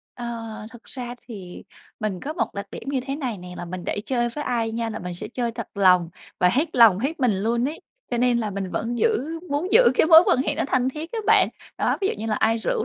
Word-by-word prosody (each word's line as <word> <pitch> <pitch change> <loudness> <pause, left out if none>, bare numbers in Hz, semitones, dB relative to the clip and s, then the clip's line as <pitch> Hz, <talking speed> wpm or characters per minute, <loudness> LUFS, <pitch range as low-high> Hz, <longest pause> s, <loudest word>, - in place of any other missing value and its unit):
Ờ, 240 - -6 0.5
thực 240 -1 -14
ra 245 -2 -7
thì 190 -6 -9 0.4
mình 205 -4 -2
có 300 - -4
một - - -2
đặc 200 0 -5
điểm - - -8
như 275 -2 0
thế 270 +2 -4
này 250 -8 -3
nè, 180 0 -9
là - - -5
mình 180 +1 -7
để - - -2
chơi 240 -2 +1
với 295 +5 -5
ai 230 -3 -1
nha, 230 0 -2
là 220 - -5
mình 180 0 -6
sẽ 195 +5 -6
chơi 240 0 -2
thật 230 -1 -6
lòng 180 -4 +4 0.3
và 180 - +5
hết 290 - 0
lòng, 225 -6 +7
hết 280 +7 -2
mình 250 -4 +3
luôn 235 +5 0
ấy, 315 - -7 0.3
cho 240 - -1
nên 245 0 +3
là 220 -3 -2
mình 195 -1 -4
vẫn 235 +5 -2
giữ 330 - 0
muốn 300 +6 -2
giữ 485 - +8
cái - - +4
mối 325 0 +9
quan - - +3
hệ - - -1
nó - - -1
thân 260 -2 +1
thiết 305 +5 -6
á 460 - -2
bạn. - - +5 0.3
Đó, - - +1
ví 390 - +1
dụ - - -1
như 220 - -4
là 215 - 0
ai 225 +2 +2
rủ 460 - -1
240 Hz, 265 wpm, -24 LUFS, 205-275 Hz, 0.5 s, mối